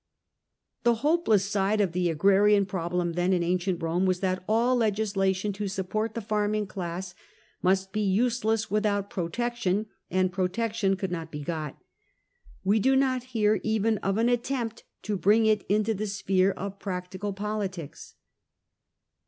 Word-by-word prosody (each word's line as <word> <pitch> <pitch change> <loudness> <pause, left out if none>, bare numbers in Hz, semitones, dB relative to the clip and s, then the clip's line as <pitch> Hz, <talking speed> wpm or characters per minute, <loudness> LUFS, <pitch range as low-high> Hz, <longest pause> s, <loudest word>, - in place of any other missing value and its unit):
The 235 -1 +3
hopeless 295 - +3
side 200 +1 +1
of 195 -4 +2
the 175 0 0
agrarian 200 +5 +4
problem, 175 -2 -2
then, 175 +2 +1
in 175 -2 +1
ancient 180 0 -1
Rome, 175 +3 +1
was 185 -1 +1
that 185 -1 -1
all 235 +4 +3
legislation 205 -3 0
to 205 +1 -3
support 195 +3 -2
the 230 - -2
farming 210 0 0
class 180 -1 -5 0.5
must 190 +1 +1
be 215 - -1
useless 220 +1 +1
without 205 -1 0
Protection, 215 +1 -1 0.2
and 185 0 +1
Protection 195 +2 0
could 190 -1 -4
not 165 -2 -4
be 150 -1 -6
got. 155 -2 -4 0.9
We 205 +3 +3
do 265 +5 +3
not 260 -1 +2 0.2
hear 210 0 +3
even 220 -1 +1
of 195 +1 -1
an 230 +1 +3
attempt 240 -1 -1 0.2
to 210 - -1
bring 215 +4 +4
it 215 -2 +3
into 215 +2 +2
the 215 +1 -3
sphere 195 -1 +1
of 195 0 -5
practical 185 +1 -4
politics. 195 -5 -5
200 Hz, 150 wpm, -27 LUFS, 185-215 Hz, 0.9 s, agrarian